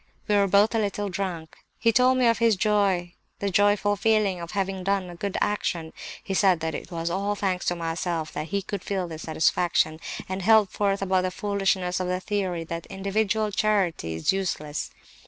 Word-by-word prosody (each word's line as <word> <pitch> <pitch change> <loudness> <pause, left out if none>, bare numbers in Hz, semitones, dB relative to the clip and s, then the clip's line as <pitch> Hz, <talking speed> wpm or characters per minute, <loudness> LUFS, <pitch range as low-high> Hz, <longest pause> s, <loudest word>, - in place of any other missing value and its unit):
We 210 - +2
were 200 -1 +4
both 200 +4 +4
a 225 - +2
little 205 -1 -1
drunk. 175 -4 -4 0.2
He 230 0 +3
told 255 +3 +4
me 255 - +3
of 230 0 +3
his 230 -2 +4
joy, 195 -4 +1 0.2
the 200 -1 -2
joyful 205 +1 +3
feeling 205 -3 +1
of 170 - -6
having 195 -2 -2
done 195 -2 0
a - - -10
good 200 +2 -3
action; 170 -6 -1 0.3
he 195 - -4
said 190 -3 +4
that 160 0 -2
it - - -6
was 170 -1 -3
all 200 +3 -1
thanks 190 -3 -1
to 175 - +1
myself 165 -1 -3
that 155 - -4
he 200 +2 -2
could 200 -1 -5
feel 190 -3 -2
this 160 -1 -8
satisfaction; 160 0 +1 0.3
and 190 +1 -3
held 215 0 +5
forth 200 -1 0
about 190 -1 +2
the 185 - -1
foolishness 195 -2 0
of 185 - -2
the 180 0 -1
theory 185 -3 -2
that 165 0 -6
individual 205 +2 -1
charity 190 - 0
is 80 - +1
useless. 155 -6 -3
195 Hz, 195 wpm, -25 LUFS, 175-205 Hz, 0.3 s, held